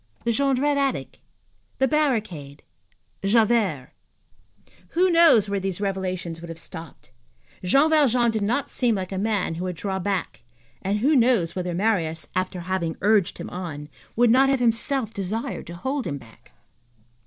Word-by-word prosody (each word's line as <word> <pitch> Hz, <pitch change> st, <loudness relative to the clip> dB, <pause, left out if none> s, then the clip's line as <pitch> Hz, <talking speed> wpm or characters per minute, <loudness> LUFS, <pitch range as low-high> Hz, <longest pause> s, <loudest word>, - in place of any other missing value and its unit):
The 235 Hz, -, +1 dB
Jondrette 275 Hz, +3 st, +1 dB
attic? 270 Hz, -, -2 dB, 0.6 s
The 265 Hz, -, +3 dB
barricade? 215 Hz, -, -1 dB, 0.6 s
Javert? 210 Hz, -, +2 dB, 1.1 s
Who 370 Hz, +1 st, +4 dB
knows 330 Hz, -, +6 dB
where 200 Hz, 0 st, -1 dB
these 190 Hz, -1 st, -3 dB
revelations 185 Hz, -4 st, -3 dB
would 170 Hz, -, -9 dB
have 165 Hz, -, -7 dB
stopped? 165 Hz, -4 st, -11 dB, 0.5 s
Jean 275 Hz, -, +4 dB
Valjean 250 Hz, -6 st, +3 dB
did 220 Hz, -1 st, -2 dB
not 240 Hz, +7 st, -1 dB
seem 240 Hz, -3 st, +1 dB
like 185 Hz, -1 st, -4 dB
a 190 Hz, -, -3 dB
man 205 Hz, -4 st, 0 dB
who 175 Hz, +3 st, -4 dB
would 180 Hz, -1 st, -3 dB
draw 190 Hz, +2 st, -3 dB
back, 185 Hz, -, -3 dB, 0.4 s
and 205 Hz, +2 st, -1 dB
who 295 Hz, +5 st, +3 dB
knows 230 Hz, -10 st, +3 dB
whether 180 Hz, -2 st, -3 dB
Marius, 170 Hz, -6 st, 0 dB
after 185 Hz, -1 st, -2 dB
having 170 Hz, -2 st, -2 dB
urged 205 Hz, -3 st, +2 dB
him -, -, -7 dB
on, 155 Hz, -5 st, -6 dB, 0.3 s
would 240 Hz, 0 st, +4 dB
not 265 Hz, +3 st, +5 dB
have 270 Hz, -1 st, +2 dB
himself 235 Hz, 0 st, +1 dB
desired 200 Hz, +4 st, -4 dB
to 170 Hz, -, -8 dB
hold 265 Hz, +7 st, -3 dB
him 140 Hz, -3 st, -3 dB
back? 115 Hz, -4 st, -17 dB
200 Hz, 155 wpm, -24 LUFS, 175-245 Hz, 1.1 s, knows